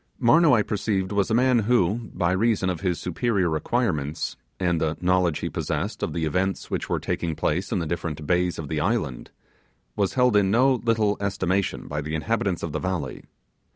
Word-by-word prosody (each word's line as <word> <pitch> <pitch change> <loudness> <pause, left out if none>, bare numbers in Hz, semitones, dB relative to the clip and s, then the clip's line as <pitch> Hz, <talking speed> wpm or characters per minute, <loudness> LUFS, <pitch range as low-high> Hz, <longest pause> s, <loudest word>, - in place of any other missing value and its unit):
Marnoo, 150 +5 +5
I 110 -3 +4
perceived, 100 -2 -1
was 100 0 +1
a 110 - +2
man 125 0 +4
who, 115 0 +1
by 85 -1 +1
reason 95 -1 +1
of 85 - -5
his 90 -3 -1
superior 90 -3 0
acquirements, 80 - -1 0.2
and 85 -3 +1
the 80 0 0
knowledge 90 -3 +1
he - - -1
possessed - - -3
of - - -1
the 85 -2 -1
events 95 +4 -1
which - - -2
were - - 0
taking 85 -2 -2
place 90 +6 -1
in - - +1
the 85 - -1
different 80 -2 -4
bays 90 +2 +1
of 80 - -5
the 75 +1 -2
island, 80 - -1 0.7
was 100 -2 0
held 125 -3 +3
in 100 -2 +4
no 130 +6 +4
little 110 -3 +2
estimation 95 -1 -1
by 75 0 -3
the 75 +2 -4
inhabitants 95 +1 -1
of 85 - -3
the 80 - -2
valley. 90 -9 -3
95 Hz, 190 wpm, -25 LUFS, 80-110 Hz, 0.7 s, Marnoo